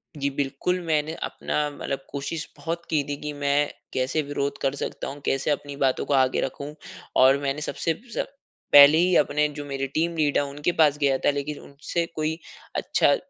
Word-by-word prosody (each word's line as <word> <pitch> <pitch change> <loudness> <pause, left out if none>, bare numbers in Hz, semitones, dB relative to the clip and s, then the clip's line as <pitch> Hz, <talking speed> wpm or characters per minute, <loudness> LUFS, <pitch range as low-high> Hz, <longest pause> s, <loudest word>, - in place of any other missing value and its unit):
जी, 140 -1 -1
बिल्कुल। 140 +6 -1
मैंने 155 -1 0
अपना 150 0 -2
मतलब 135 -1 -5
कोशिश 145 +3 -4
बहुत 170 +1 -4
की 150 -3 +2
थी 145 - -2
कि 150 0 -4
मैं 145 0 +1 0.2
कैसे 130 +4 0
विरोध 140 -1 -2
कर 135 0 0
सकता - - -4
हूँ, 140 +1 -7
कैसे 135 +2 +1
अपनी 145 -1 -3
बातों 130 -1 +1
को - - -1
आगे 130 -1 +3
रखूँ 140 +3 -4 0.5
और 135 +1 +6
मैंने 140 +1 -2
सबसे 165 +2 -1 0.2
सब - - -1 0.5
पहले 145 +2 +10
ही 180 +2 +3
अपने 150 0 +3
जो 145 - -5
मेरे 135 -1 -3
टीम 165 +5 -1
लीडर 150 -2 +3
उनके 145 +4 -1
पास 150 -2 +5
गया 140 -2 +2
था। - - +5
लेकिन 145 +1 -4
उनसे 150 +4 -3
कोई 155 +1 -1 0.4
अच्छा - - +3
145 Hz, 185 wpm, -25 LUFS, 140-155 Hz, 0.5 s, पहले